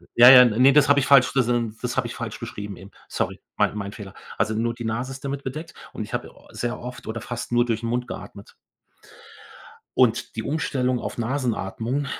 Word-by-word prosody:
Ja, 120 +1 +9
ja, 125 -1 +10
ne, 125 +4 +4
das 145 -1 +5
habe 140 0 +6
ich 130 - 0
falsch, 130 -2 +6
das 130 -3 +2
n 120 -3 0
das 125 0 -3
habe 120 -2 +1
ich - - -8
falsch 115 -2 -6
beschrieben 105 -4 -7
eben. 95 +1 -13 0.2
Sorry, - - -3 0.2
mein - - +1
mein 100 0 -5
Fehler. 100 -3 -10 0.2
Also 110 - 0
nur 115 +1 0
die 120 -1 -7
Nase 125 +4 -3
ist 135 +1 -9
damit 140 0 -4
bedeckt 155 +5 -6 0.2
und - - -4
ich - - -10
habe - - -4
au - - -20
sehr 120 0 -4
oft 125 -1 -9
oder 110 0 -4
fast 120 0 -6
nur 120 0 +3
durch 115 -1 -2
'n 115 - -2
Mund 125 +1 -2
geatmet. 100 +1 -10 1.4
Und 125 -3 +2
die 110 - -3
Umstellung 130 -5 -1
auf - - -6
Nasenatmung 120 +1 -2
120 Hz, 215 wpm, -24 LUFS, 110-130 Hz, 1.4 s, ja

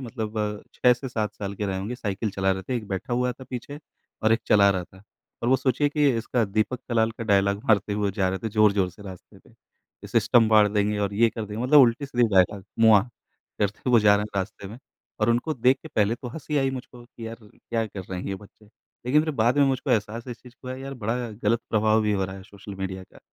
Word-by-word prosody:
मतलब 110 -4 -4
6 125 - +4
से 130 +2 -7
7 105 -4 -3
साल 100 0 -5
के 105 +1 -3
रहे 95 -1 -2
होंगे, 105 +6 -4
साइकिल 105 -2 -3
चला 95 0 0
रहे 95 0 -5
थे, 125 +3 -3
एक 110 -3 -6
बैठा 95 +5 -4
हुआ 125 +1 +1
था 130 - -13
पीछे 135 +4 -6 0.4
और 110 - +4
एक 115 - +2
चला 100 -1 +5
रहा 90 -2 -2
था। 95 +2 -19 0.4
और 120 - 0
वो 130 - +5
सोचिए 130 +3 +1
कि 145 -1 +2
इसका 120 +1 0
दीपक 110 +5 -1
कलाल 115 -2 +2
का 115 0 -7
डायलॉग 100 0 +2
मारते 105 -1 +3
हुए 100 -1 0
जा 95 -3 0
रहे 95 - -2
थे 110 - -4
ज़ोर-ज़ोर 100 -3 +3
से 105 - -15
रास्ते 95 -3 -12
पे, - - -23
कि - - -19
सिस्टम 115 -2 +3
फाड़ 105 -1 +6
देंगे 105 0 0
और 100 -1 -1
ये 115 +2 +4
कर 110 - -5
देंगे, 105 +4 -4
मतलब 145 +2 +7
उल्टे-सीधे 125 -1 +2
डायलॉग, 95 +1 +3 0.2
मुआ 110 -3 +7 0.6
करते 105 +5 -1
हुए 120 - +6
जा 105 -1 +6
रहे 105 - -1
हैं 100 -2 -4
रास्ते 95 +1 -5
में। 115 +4 -10 0.4
और 110 +2 +3
उनको 120 +7 0
देख 130 +3 +3
के 160 - -9
पहले 105 -3 +1
तो 125 +1 -8
हँसी 150 +2 -5
आई 135 -1 +1
मुझको 125 -2 -9
कि 115 -1 -10
यार 115 - -6
क्या 115 +2 -4
कर 100 -2 -8
रहे 90 -1 -3
हैं - - -7
ये 100 - -2
बच्चे? 105 +2 -15 0.4
लेकिन 150 +4 +4
फिर 155 - -1
बाद 120 +3 +2
में 140 - +6
मुझको 135 0 -1
एहसास 115 +2 -1
है - - -6
इस 120 - -15
चीज़ 125 0 -15
का 130 - -12
हुआ 130 - -5
यार, 135 +1 -7
बड़ा 120 0 -3
गलत 110 +2 0
प्रभाव 110 0 +3
भी 105 -1 +1
हो 95 -1 0
रहा 95 +1 -7
है 95 - -10
सोशल 100 0 -11
मीडिया 95 -1 -5
का, - - -19
110 Hz, 250 wpm, -25 LUFS, 100-125 Hz, 0.6 s, मतलब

